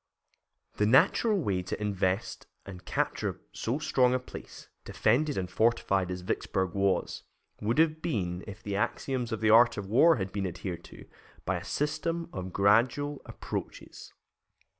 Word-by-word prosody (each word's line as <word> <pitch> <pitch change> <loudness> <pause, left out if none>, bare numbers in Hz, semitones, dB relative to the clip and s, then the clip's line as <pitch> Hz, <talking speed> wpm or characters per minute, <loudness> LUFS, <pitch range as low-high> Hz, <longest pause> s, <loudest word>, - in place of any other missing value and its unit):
The 105 - +2
natural 200 - +4
way 100 - 0
to 90 - -5
invest 100 -1 -2 0.2
and 90 -2 -10
capture - - -2
so 120 +5 -2
strong 130 -4 +2
a - - +1
place, 125 - -11 0.2
defended 140 +7 +1
and 90 - -1
fortified 100 -2 +1
as 90 0 -4
Vicksburg 95 0 -2
was, 100 -1 0 0.4
would 115 +5 0
have 160 0 +3
been, 90 - -2
if 100 -2 -9
the 100 -1 -3
axioms 125 +3 -2
of 110 - -3
the 110 -1 +4
art 120 +1 +6
of 100 - -4
war 130 +12 +5
had 95 -1 -4
been 100 -1 -2
adhered 90 0 -6
to, - - -13 0.4
by 95 0 0
a 85 - -7
system 165 - -2
of 95 0 -5
gradual 120 +9 +2
approaches. - - -7
105 Hz, 155 wpm, -29 LUFS, 95-130 Hz, 0.4 s, art